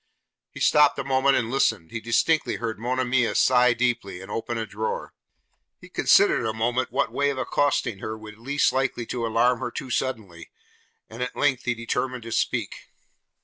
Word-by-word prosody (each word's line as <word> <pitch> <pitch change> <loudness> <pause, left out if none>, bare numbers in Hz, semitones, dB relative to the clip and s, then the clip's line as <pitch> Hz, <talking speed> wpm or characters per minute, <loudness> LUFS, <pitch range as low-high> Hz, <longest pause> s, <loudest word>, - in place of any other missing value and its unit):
He - - -11
stopped 150 -1 +4
a 135 - -2
moment 135 +1 +2
and 115 -2 -2
listened; 90 -11 0
he 115 - -4
distinctly 155 +8 +1
heard 115 -2 -4
Monimia 125 0 0
sigh 125 -1 +4
deeply, 120 -6 -1
and 95 +2 -10
open 115 +2 -3
a 110 - -2
drawer. 110 +1 -4 0.7
He - - -14
considered - - +4
a 110 -1 -1
moment 120 +3 -1
what - - 0
way 140 0 +1
of 140 - -3
accosting 130 -4 0
her 110 +2 -5
would 110 0 -12
least 140 +5 +1
likely 130 -2 -1
to 115 0 -3
alarm 120 +2 +2
her - - -3
too 130 - -7
suddenly, 110 -10 -3 0.6
and 115 +3 -10
at 125 - -3
length 130 -4 +1
he 125 - 0
determined 125 +2 -3
to 115 - -8
speak. - - -2
120 Hz, 180 wpm, -25 LUFS, 110-130 Hz, 0.7 s, stopped